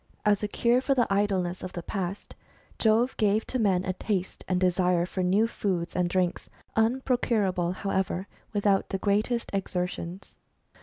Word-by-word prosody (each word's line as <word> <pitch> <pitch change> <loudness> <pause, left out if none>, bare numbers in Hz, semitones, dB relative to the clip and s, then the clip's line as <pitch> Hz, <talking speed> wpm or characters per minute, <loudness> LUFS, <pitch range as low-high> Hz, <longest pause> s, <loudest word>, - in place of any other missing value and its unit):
As 205 -1 +3
a 210 - 0
cure 235 +4 +2
for 275 +1 +1
the 245 -3 +3
idleness 190 -3 0
of 185 - -6
the 175 - -5
past, 190 0 -4 0.5
Jove 230 +3 +3
gave 215 0 +2
to 255 - -2
men 190 -4 +2
a 185 - -1
taste 190 -1 -3
and 185 -1 +1
desire 180 -1 +2
for 185 +1 -3
new 190 +5 +3
foods 185 -6 -2
and 180 -1 +1
drinks, 180 -1 -1 0.3
unprocurable, 220 -6 +1
however, 190 -1 -2 0.2
without 205 -2 +2
the 195 - -1
greatest 210 +5 0
exertions. 180 -1 -3
195 Hz, 155 wpm, -27 LUFS, 180-215 Hz, 0.5 s, As